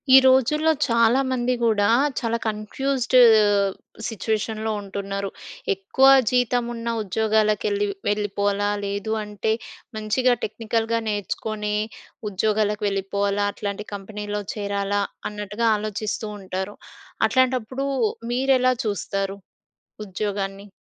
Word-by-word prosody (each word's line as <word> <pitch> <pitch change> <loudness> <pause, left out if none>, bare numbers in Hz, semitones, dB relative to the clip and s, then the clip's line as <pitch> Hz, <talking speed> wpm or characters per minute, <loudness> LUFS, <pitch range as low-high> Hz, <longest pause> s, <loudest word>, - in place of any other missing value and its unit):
ఈ - - +12
రోజుల్లో 265 +5 +4
చాలామంది 250 +1 +2
గుడా 210 -3 +3 0.3
చాలా 230 -1 -1
కన్‌ఫ్యూ‌జ్డ్ 245 +5 -1 0.9
సిట్యుయేషన్‌లో 220 0 -2
ఉంటున్నారు. 200 0 -4 0.4
ఎక్కువ 195 +7 +1 0.3
జీతం 245 -1 +2
ఉన్న 230 0 -6
ఉద్యోగాలకెళ్ళి 210 0 +1 0.2
వెళ్ళిపోవాలా? 205 0 0 0.2
లేదు 200 +2 -3
అంటే, 210 +1 -2 0.5
మంచిగా 225 +4 +2
టెక్నికల్‌గా 225 +1 -1
నేర్చుకొని 210 +1 -2 0.5
ఉద్యోగాలకు 210 +1 0
వెళ్ళిపోవాలా? 200 +1 0
అట్లాంటి 205 +1 -4
కంపెనీలో 205 +1 -5
చేరాలా? 200 -2 -1 0.3
అన్నట్టుగా 210 +2 -2
ఆలోచిస్తూ 215 +1 -3
ఉంటారు. 190 +1 -5 0.5
అట్లాంటప్పుడు 260 0 +1 0.5
మీరెలా 255 0 +3
చూస్తారు 195 -1 -2 0.7
ఉద్యోగాన్ని? 195 0 -4
210 Hz, 85 wpm, -23 LUFS, 200-230 Hz, 0.9 s, ఈ